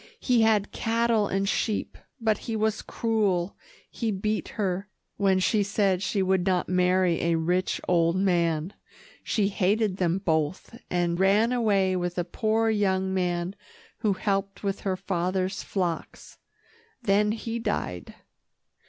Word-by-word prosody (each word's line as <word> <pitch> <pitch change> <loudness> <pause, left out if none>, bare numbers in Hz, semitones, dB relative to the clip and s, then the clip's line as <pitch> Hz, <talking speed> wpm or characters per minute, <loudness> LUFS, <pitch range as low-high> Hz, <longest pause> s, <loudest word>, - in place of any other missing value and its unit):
"He 245 -3 +2
had 215 -2 +3
cattle 225 -2 +1
and 195 +1 -1
sheep, 210 +1 -1 0.2
but 220 -3 +1
he 225 - -1
was 220 0 0
cruel. 205 -6 0 0.4
He 230 - -2
beat 210 +1 -1
her, 195 -1 -1 0.3
when 195 -2 +3
she 205 +3 +2
said 200 -2 +1
she 195 0 0
would 190 -1 +2
not 185 -1 +1
marry 180 -1 +2
a 170 0 +2
rich, 180 +3 0
old 170 -1 +3
man. 175 -2 +1 0.5
She 200 -3 +1
hated 200 +1 +1
them 180 -1 +1
both, 160 +2 -1
and 175 -1 0
ran 205 +5 +4
away 200 -6 +2
with 175 0 -2
a 175 - +1
poor 220 +5 0
young 190 -3 +1
man 180 -1 -1 0.5
who 215 -3 +1
helped 195 +1 -2
with 200 -1 -1
her 190 -2 -2
father's 185 +1 -1
flocks. 175 -4 -4 0.6
Then 210 0 +3
he 230 +1 -4
died." 90 - -3
195 Hz, 140 wpm, -26 LUFS, 180-215 Hz, 0.6 s, ran